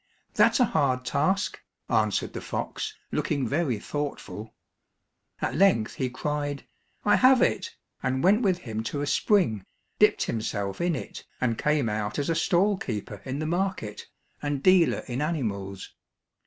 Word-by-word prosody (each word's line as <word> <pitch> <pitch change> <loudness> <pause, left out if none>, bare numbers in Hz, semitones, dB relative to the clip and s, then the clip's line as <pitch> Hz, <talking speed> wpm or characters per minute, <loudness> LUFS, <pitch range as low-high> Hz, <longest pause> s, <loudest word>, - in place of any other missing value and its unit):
"That's 230 +3 +4
a 250 - +6
hard 130 - +1
task," 155 +10 0 0.3
answered - - +1
the - - -5
fox, 430 0 -4
looking 140 -6 0
very 140 -3 0
thoughtful. 110 -6 -5 0.9
At - - 0
length 155 - +3
he 130 -2 -2
cried, 145 +1 -3 0.4
"I 205 - +5
have 255 0 +6
it!" 460 0 0 0.3
and 130 +1 -1
went 205 +5 +5
with 190 -6 +2
him 110 -8 -5
to 145 - -2
a - - 0
spring, 145 - +2 0.4
dipped - - +4
himself 100 - -3
in 175 -2 +1
it, - - -7 0.2
and 120 -3 +1
came 150 -1 +1
out 105 -1 -2
as 145 +2 0
a - - +1
stall 195 +4 +2
keeper 105 - -5
in 130 +1 -3
the 155 - -2
market, 175 - -2 0.3
and 145 -2 -2
dealer 185 -3 +4
in 125 +1 -3
animals. 100 - -3
145 Hz, 155 wpm, -27 LUFS, 115-180 Hz, 0.9 s, a